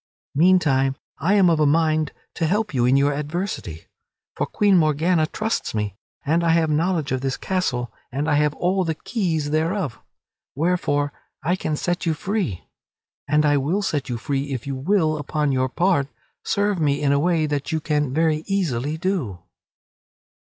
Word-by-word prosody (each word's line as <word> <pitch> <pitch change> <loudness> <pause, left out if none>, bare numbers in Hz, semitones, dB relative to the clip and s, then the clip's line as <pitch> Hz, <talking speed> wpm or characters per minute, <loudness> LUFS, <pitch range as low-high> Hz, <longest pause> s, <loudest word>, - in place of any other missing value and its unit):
Meantime, 145 -5 +3 0.2
I 185 +8 +2
am 195 -3 +5
of 165 -2 +3
a 150 - +4
mind 155 0 +2 0.2
to 165 - -1
help 210 +2 0
you 120 -2 +2
in 130 +2 +4
your 140 +1 +3
adversity. 150 - -4 0.5
For - - -1
Queen 205 -2 +3
Morgana 155 0 +3
trusts 220 - -2
me, 105 -2 -2 0.3
and 165 +4 +2
I 165 -1 +3
have 165 -2 +2
knowledge 160 -2 0
of 130 -1 0
this 135 -1 -2
castle 125 -11 -2 0.2
and 140 +4 -2
I 155 - +2
have 150 0 +2
all 185 +2 +1
the 165 -2 -1
keys 160 -7 -2
thereof, 160 - -1 0.6
wherefore 145 -3 0 0.3
I 175 +3 +2
can 155 -4 -2
set 175 +3 -2
you 160 - +2
free. 185 - -2 0.6
And 150 +1 +3
I 145 -1 +4
will 165 +10 0
set 145 -8 -2
you 120 - -2
free 140 +4 -2
if 130 -4 -4
you 140 -1 -3
will, 155 +1 +1
upon 150 0 -1
your 130 0 +1
part, 170 -2 +1 0.4
serve 200 -2 0
me 145 -2 +1
in 140 -1 +2
a 140 - +3
way 165 0 +2
that 145 0 -2
you 160 - 0
can 150 -3 0
very 155 +1 +1
easily 155 -7 -1
do." 160 - -2
155 Hz, 175 wpm, -23 LUFS, 140-175 Hz, 0.6 s, am